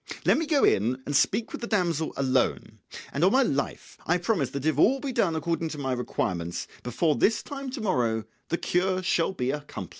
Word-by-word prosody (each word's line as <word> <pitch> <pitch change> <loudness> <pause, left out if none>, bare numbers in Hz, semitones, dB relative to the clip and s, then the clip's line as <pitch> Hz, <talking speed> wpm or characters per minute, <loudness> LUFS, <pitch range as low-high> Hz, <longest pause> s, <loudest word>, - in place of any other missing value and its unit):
Let - - +4
me 325 - -2
go 295 -3 +3
in 120 +6 +3
and 145 - -2
speak 215 +10 +2
with - - -6
the 235 - -3
damsel 170 -7 0
alone, 135 -2 0 0.3
and 140 - 0
on 185 - +5
my 270 +3 +5
life 140 - -3
I 175 - +3
promise 175 - 0
that 140 +2 -5
if 155 -2 +1
all 265 +11 +5
be 275 0 -3
done 195 -9 +1
according 165 0 -1
to 155 - -6
my 135 -2 -2
requirements, 85 -8 -2
before 150 +6 +1
this 220 0 +2
time 275 -1 -6
to 255 -1 -5
morrow 120 - +1 0.3
the 170 - 0
cure 185 +2 0
shall 170 -1 +1
be 130 -8 -1
accomplished." 145 0 -6
165 Hz, 210 wpm, -27 LUFS, 135-210 Hz, 0.3 s, on